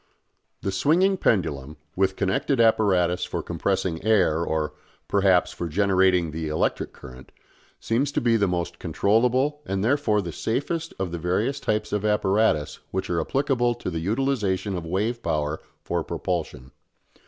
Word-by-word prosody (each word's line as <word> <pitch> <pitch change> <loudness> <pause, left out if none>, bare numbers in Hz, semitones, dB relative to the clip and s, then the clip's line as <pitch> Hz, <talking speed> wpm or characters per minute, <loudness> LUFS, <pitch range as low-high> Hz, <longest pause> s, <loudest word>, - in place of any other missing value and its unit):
The 100 - -1
swinging 165 - +3
pendulum, 75 - 0 0.2
with 95 0 +1
connected 105 +7 0
apparatus 95 -6 +3
for - - -3
compressing 95 -4 -2
air 95 -7 +3
or, 80 -3 -1 0.3
perhaps, 95 -3 +3
for 85 - -4
generating 95 -1 +2
the 80 +1 -4
electric 75 0 -1
current, 65 0 -13 0.5
seems 130 +5 0
to - - +1
be 120 -1 +2
the 100 -3 +2
most 85 -1 -3
controllable 125 - +1
and 95 0 -2
therefore 110 -4 +2
the 85 - -5
safest 150 - -3
of 95 -2 -3
the 85 - -4
various 105 - 0
types 110 -5 -1
of 105 -1 0
apparatus 105 -6 +1
which 95 -1 -3
are 85 -1 +1
applicable 120 - +1
to 115 - -5
the 80 - -3
utilisation 105 -1 -1
of 85 -2 -5
wave 110 +7 -1
power 75 -3 -1 0.2
for - - -1
propulsion. 65 +1 -4
95 Hz, 150 wpm, -25 LUFS, 85-115 Hz, 0.5 s, swinging